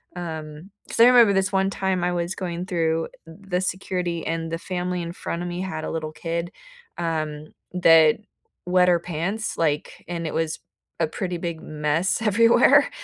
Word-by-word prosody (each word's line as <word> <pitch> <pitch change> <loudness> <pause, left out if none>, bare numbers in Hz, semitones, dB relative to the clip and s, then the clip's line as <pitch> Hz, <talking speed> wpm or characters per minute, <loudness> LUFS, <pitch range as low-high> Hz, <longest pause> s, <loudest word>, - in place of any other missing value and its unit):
Um, 160 0 -7 0.2
'cause - - -5
I - - +10
remember 235 -5 +7
this 195 +1 +2
one 195 0 +2
time 190 -2 -1
I 180 - 0
was 175 +1 -2
going 175 -1 -4
through 165 -2 0 0.2
the 180 +2 -4
security, 180 -2 -2
and 165 0 -2
the 165 - -1
family 180 -1 -3
in 170 0 -5
front 170 -1 -4
of 175 - -3
me 175 +1 -4
had 160 -5 -4
a - - -4
little 155 -1 -3
kid, 170 +1 -3 0.5
um, 155 -2 -3 0.2
that 165 -3 +6 0.5
wet 180 0 +4
her 175 - +5
pants, 180 +6 -3
like, 150 -2 -1
and 170 -1 -4
it - - -4
was 160 -1 -1 0.4
a 160 - +3
pretty 180 +1 -4
big 170 -2 -4
mess 155 +7 0
everywhere, 230 +2 +5
175 Hz, 175 wpm, -24 LUFS, 160-185 Hz, 0.5 s, I